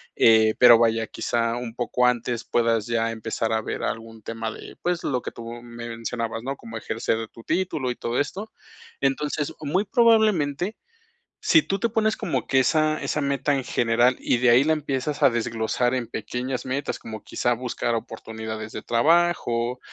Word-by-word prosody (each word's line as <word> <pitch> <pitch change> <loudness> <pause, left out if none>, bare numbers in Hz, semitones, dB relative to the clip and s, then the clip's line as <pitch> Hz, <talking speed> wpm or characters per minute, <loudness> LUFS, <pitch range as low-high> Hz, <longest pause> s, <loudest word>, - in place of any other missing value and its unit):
eh, 110 -1 +5
pero 120 -2 +9
vaya, 115 -1 +2
quizá 115 0 -1
un 120 -2 -6
poco 125 +1 +1
antes 120 0 -1
puedas 115 -2 +1
ya 115 -1 0
empezar 110 0 -3
a 110 - +1
ver - - -4
algún 115 0 -5
tema 115 -1 -4
de, - - -11
pues, 175 -1 -1
lo 125 -3 -1
que - - -6
tú 115 - -10 0.2
me 120 0 -8
mencionabas, 115 -1 -4
¿no? 135 +1 -3
Cómo 115 0 -8
ejercer 110 0 -2
tu 115 - -14
título 165 -7 -1
y 125 - -5
todo 120 +1 -3
esto. 195 +9 -3 0.5
Entonces, 145 +2 -1
muy 155 +7 0
probablemente, 210 - +3 0.6
si 325 - +5
tú 195 - -2
te 235 - +2
pones 220 -1 +1
como 195 -7 -2
que 135 - +3
esa 155 +3 +2
esa 150 - -1
meta 140 0 0
en 135 - -1
general, 120 +1 +2
y 125 - +1
de 125 0 +4
ahí 125 +3 +6
la 160 - +3
empiezas 145 -1 -3
a - - +7
desglosar 120 +1 0
en 120 -3 -2
pequeñas 125 +2 -4
metas, 135 +2 -2
como 110 -2 -8
quizá 120 - 0
buscar 120 -1 -2
oportunidades 110 -1 -6
de - - -6
trabajo, 125 -3 +2
120 Hz, 180 wpm, -24 LUFS, 115-145 Hz, 0.6 s, pero